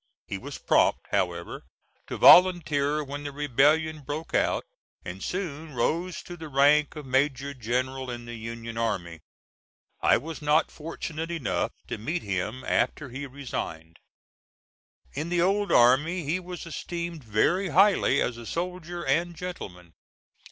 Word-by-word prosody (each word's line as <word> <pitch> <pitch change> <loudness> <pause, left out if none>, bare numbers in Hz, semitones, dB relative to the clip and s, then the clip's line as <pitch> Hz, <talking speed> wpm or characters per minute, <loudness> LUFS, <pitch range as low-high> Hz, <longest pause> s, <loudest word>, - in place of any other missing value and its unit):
He - - -5
was - - -7
prompt, - - +2
however, - - -1 0.5
to - - -5
volunteer 155 -5 +6
when 145 +1 -6
the 145 - -4
rebellion 150 +3 +2
broke 150 +4 -6
out, - - +1 0.4
and 90 +2 -7
soon 160 -5 -4
rose 170 +8 -1
to 175 - -8
the 160 -2 -8
rank 145 +2 +4
of 150 -2 -7
major 135 +1 0
general 130 +2 -2
in 120 -1 -6
the 120 - -7
Union 115 0 -6
army. 90 -8 -2 0.8
I - - +5
was 160 +1 -7
not 150 +1 +2
fortunate 160 +1 -6
enough 135 - -1
to - - -5
meet 160 +11 -3
him 100 +6 -3
after 145 +1 0
he 135 +3 -6
resigned. 85 - -6 1.1
In 155 +4 -3
the 175 -1 +2
old 200 +2 +1
army 150 +9 +4
he 160 +6 -1
was 180 -1 -8
esteemed 170 -1 -5
very 150 - +1
highly 195 -8 +4
as 120 - -3
a 120 -1 -9
soldier 175 0 -4
and 170 +6 +1
gentleman. 90 - -8
145 Hz, 145 wpm, -27 LUFS, 125-170 Hz, 1.1 s, volunteer